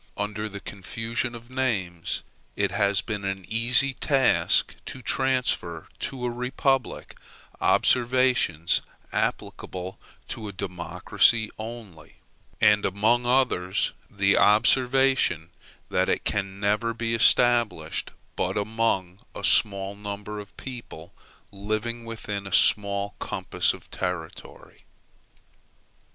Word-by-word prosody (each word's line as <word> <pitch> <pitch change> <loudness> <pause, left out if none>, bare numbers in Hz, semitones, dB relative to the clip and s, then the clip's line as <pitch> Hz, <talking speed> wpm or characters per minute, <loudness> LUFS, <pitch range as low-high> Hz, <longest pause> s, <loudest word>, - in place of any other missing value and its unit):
Under 105 +1 -2
the 100 0 -7
confusion 115 +5 -4
of 120 +1 -11
names, 100 -10 -2 0.3
it - - 0
has 100 0 +2
been 105 -2 -4
an 95 -1 -3
easy 120 +4 +3
task 135 0 +2
to 130 - -8
transfer 125 -13 0
to 130 -2 -4
a 120 - 0
republic 130 +1 -1 0.4
observations 125 -9 +2 0.3
applicable 95 +1 -3 0.3
to 110 -2 -5
a - - -5
democracy 95 +4 +1
only; 110 -8 -9 0.4
and 105 0 +5
among 110 +5 +2
others, 120 -8 +1 0.2
the 100 -1 +2
observation 120 - +3 0.4
that - - +2
it - - 0
can 100 -1 -2
never 105 +3 0
be 115 0 -2
established 115 -7 +3 0.3
but - - -1
among 100 -4 -1 0.2
a - - -7
small 100 -1 +3
number 105 +1 -6
of 100 -1 -12
people, 120 -10 -9 0.4
living 110 +4 -3
within 105 -3 -5
a - - -8
small 100 -1 +2
compass - - 0
of - - -12
territory. 90 -3 -6
105 Hz, 110 wpm, -26 LUFS, 95-120 Hz, 0.4 s, and